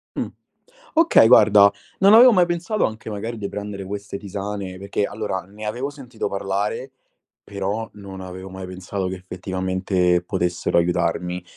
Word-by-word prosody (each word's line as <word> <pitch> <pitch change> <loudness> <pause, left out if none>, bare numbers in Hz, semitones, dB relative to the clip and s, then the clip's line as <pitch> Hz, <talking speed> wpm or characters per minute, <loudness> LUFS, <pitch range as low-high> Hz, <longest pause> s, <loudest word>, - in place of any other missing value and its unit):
Mh. - - -1 0.7
Okay, 325 - +6
guarda, 105 -4 +7 0.3
non 195 +2 +6
avevo 245 +3 +9
mai 180 -5 +4
pensato 175 +5 0
anche 110 0 -5
magari 110 +3 -5
di 100 -2 -4
prendere 100 -1 -6
queste 100 +1 -6
tisane 100 -1 -5
perché 100 +1 -2
allora, 100 -2 -3
ne 100 +4 -11
avevo 120 +6 -3
sentito 125 -7 -6
parlare, 100 +6 -2 0.5
però 100 +3 -3
non 100 -2 -9
avevo 95 +1 -8
mai 95 0 -7
pensato 95 +1 -4
che 95 - -4
effettivamente 95 0 -1
potessero 90 -1 -1
aiutarmi. 90 +1 0
100 Hz, 145 wpm, -22 LUFS, 95-110 Hz, 0.7 s, avevo